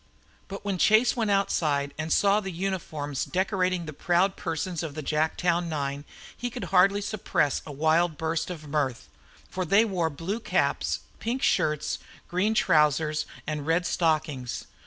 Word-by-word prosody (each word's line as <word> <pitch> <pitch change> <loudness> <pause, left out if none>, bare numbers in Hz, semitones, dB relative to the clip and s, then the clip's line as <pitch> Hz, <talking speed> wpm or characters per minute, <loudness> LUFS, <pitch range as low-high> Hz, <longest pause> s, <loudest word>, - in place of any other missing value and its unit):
But 200 +1 -8
when 195 -3 -1
Chase 220 +6 +5
went 225 -4 0
outside 150 -8 +1
and 160 +1 -4
saw 200 +1 +4
the 195 -2 -5
uniforms 165 -6 -3
decorating 185 -2 0
the 155 - -7
proud 180 +6 +2
persons 165 +1 -3
of 155 -4 -5
the 155 - -5
Jacktown 170 +3 +1
nine 140 -2 -3 0.3
he 245 - -3
could 245 +1 -6
hardly 195 +2 +5
suppress 195 -8 0
a - - -6
wild 160 +2 +2
burst 160 +1 -1
of 155 -4 -7
mirth. 140 -4 -2 0.4
For 185 - -2
they 200 +6 +4
wore 180 -6 0
blue 165 +9 -4
caps, - - 0 0.2
pink 245 +4 -2
shirts, 150 -1 +1 0.3
green 200 +5 +1
trousers, 150 -4 +2 0.2
and 150 -1 -4
red 165 +2 +2
stockings. 155 -8 -1
165 Hz, 155 wpm, -27 LUFS, 150-195 Hz, 0.4 s, Chase